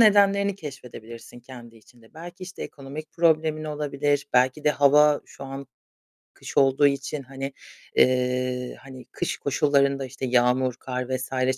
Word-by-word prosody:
nedenlerini 200 -2 +5
keşfedebilirsin 120 - -10
kendi 120 -2 -12
içinde. 115 +2 -21
Belki 175 +3 -10
işte 185 +1 -8
ekonomik 145 +3 -8
problemin 155 -2 +2
olabilir. 145 -1 -1
Belki 130 +4 +2
de 150 - +5
hava 145 +1 +5
şu 135 - -11
an 135 0 -7 0.7
kış - - -9
olduğu 135 +1 +5
için, 140 +1 -2
hani, 135 +1 -6 0.4
eee, 125 0 +1
hani 130 -2 -12
kış - - -3
koşullarında, 140 -1 +1
işte 130 +1 -6
yağmur, 125 +1 +2
kar 125 -1 -4
vs. 130 0 -1
135 Hz, 135 wpm, -25 LUFS, 125-150 Hz, 0.7 s, nedenlerini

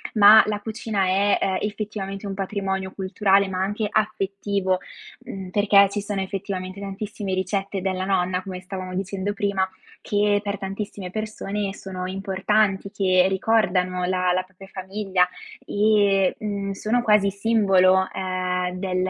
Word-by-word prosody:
ma 215 +1 +9
la 210 -1 -1
cucina 215 -2 -2
è, 195 +2 +3
ehm, 190 -1 0
effettivamente 205 -1 -4
un 195 - -3
patrimonio 190 -1 -3
culturale, 195 +1 +2
ma 185 -1 -3
anche 210 +3 -1
affettivo; 200 -3 0 0.5
mhmm, 190 -2 -7
perché 200 0 +5
ci 205 +1 -3
sono 200 -2 -1
effettivamente 190 -1 -5
tantissime 200 0 -5
ricette 195 +1 -2
della 185 0 -1
nonna, 185 -1 0
come 185 -1 -7
stavamo 185 -1 -6
dicendo 195 +1 -2
prima, 200 -3 0 0.3
che 205 0 +2
per 205 0 -3
tantissime 195 0 -5
persone 210 -1 -3
sono 185 -2 -6
importanti, 195 +1 0
che 185 -2 +3
ricordano 185 -3 +1
la 180 0 +1
la 185 +1 0
propria 190 +1 -15
famiglia, 190 -1 0 0.4
e, 205 -2 +3
mhmm, 200 -2 -3
sono 215 +5 0
quasi 210 -3 +4
simbolo, 195 -3 +3
ehm, 185 -1 -2
del 185 -1 -2
195 Hz, 140 wpm, -23 LUFS, 185-205 Hz, 0.5 s, ma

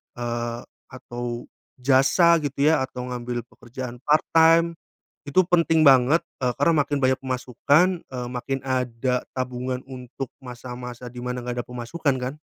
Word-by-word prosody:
eee, 120 0 -3 0.3
atau 120 -2 -6 0.3
jasa, 135 +6 +5
gitu, 140 +1 0
ya, 155 -3 +4
atau 130 -1 -6
ngambil 120 -1 -4
pekerjaan 120 0 -8
part 150 +1 +3
time, 165 +1 +5 0.5
itu 145 +5 +2
penting 165 -2 +3
banget, 135 +4 +6 0.2
eee, 125 - +2
karena 170 - +4
makin 145 +1 -2
banyak 130 0 +3
pemasukan, 140 +7 +1
eee, 125 -2 -5
makin 135 +2 -3
ada 125 -1 -1
tabungan 125 0 -3
untuk 130 0 -7 0.2
masa-masa 125 0 -8
di 125 - -9
mana 125 0 -3
nggak 120 0 -3
ada - - -34
pemasukan, 125 +4 -2
kan. 125 +3 -4
130 Hz, 145 wpm, -24 LUFS, 125-140 Hz, 0.5 s, banget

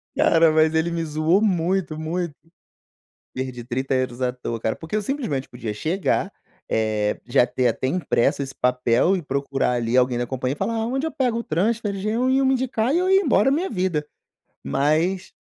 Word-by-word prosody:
Cara, 165 -1 +4
mas 155 0 +3
ele 160 +2 +1
me 170 0 -2
zoou 155 +5 +1
muito, 180 -4 0
muito. 165 0 -3 1.0
Perdi 130 -2 -5
30€ 130 0 -2
à 125 - +1
toa, 120 -2 -5
cara, 110 - -1
porque 160 +5 -6
eu 215 - +1
simplesmente 205 - -3
podia 120 -3 -5
chegar, 165 - -1 0.4
eh, 110 -1 0
já 120 0 +3
ter 125 0 0
até 130 - -1
impresso 140 -3 +1
esse 135 0 -7
papel 125 +7 +2
e 185 - -2
procurar 140 -3 -1
ali 120 -1 -1
alguém 125 -1 +3
da 120 0 -2
compania 130 0 -2
e - - -11
falar: 225 +4 -1
"Onde 265 +5 -1
eu - - -4
pego 245 -3 0
o - - -4
transfer?" 210 +5 0
Já 195 +2 -3
iam 260 +4 +2
me 265 - +3
indicar 255 -1 0
e - - +3
eu 365 +1 +1
ia 385 +1 +5
embora 270 - +3
minha 335 +7 0
vida. 180 -6 -1 0.6
Mas, 160 - 0
160 Hz, 185 wpm, -23 LUFS, 130-210 Hz, 1.0 s, ia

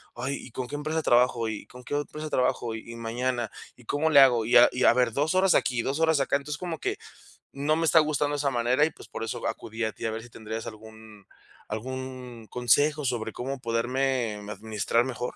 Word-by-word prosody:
"Ay, 135 +3 -3
¿y 120 - -11
con 125 0 -4
qué - - -4
empresa 155 +2 -2
trabajo? 120 -2 +3
¿Y 105 - -6
con 125 0 -13
qué 145 - -4
empresa 150 +1 -4
trabajo? 120 -3 0
¿Y 110 +1 -9
y - - -9
mañana? 120 0 -2 0.2
¿Y 125 - -18
cómo 150 +6 +1
le 145 -3 +7
hago? 120 -4 +5
Y 120 - +1 0.2
y 125 - -1
a - - +7
ver, 125 -1 +2
2 150 +5 0
horas 190 -1 +4
aquí, 120 -2 +2
2 140 +3 -2
horas 160 -2 +3
acá". 135 - +2
Entonces, 145 +1 -6
como 175 -3 -4
que 400 +1 -2 0.6
no 145 +3 +1
me 165 - +1
está 160 - +6
gustando 150 -1 +1
esa 140 -1 +1
manera 120 +4 +2
y, - - 0
pues, - - -14
por 115 - -5
eso 115 - -3
acudí 115 +1 -4
a 110 - -3
ti 110 - -7
a 110 - 0
ver 110 +1 -5
si 120 - -13
tendrías 110 +1 -6
algún 110 -2 -12 0.4
algún 125 0 -6
consejo 145 +5 +2
sobre 115 -3 -2
cómo 135 +2 -4
poderme 120 0 0
administrar 110 +2 0
mejor. 125 -1 -4
125 Hz, 220 wpm, -27 LUFS, 115-145 Hz, 0.6 s, le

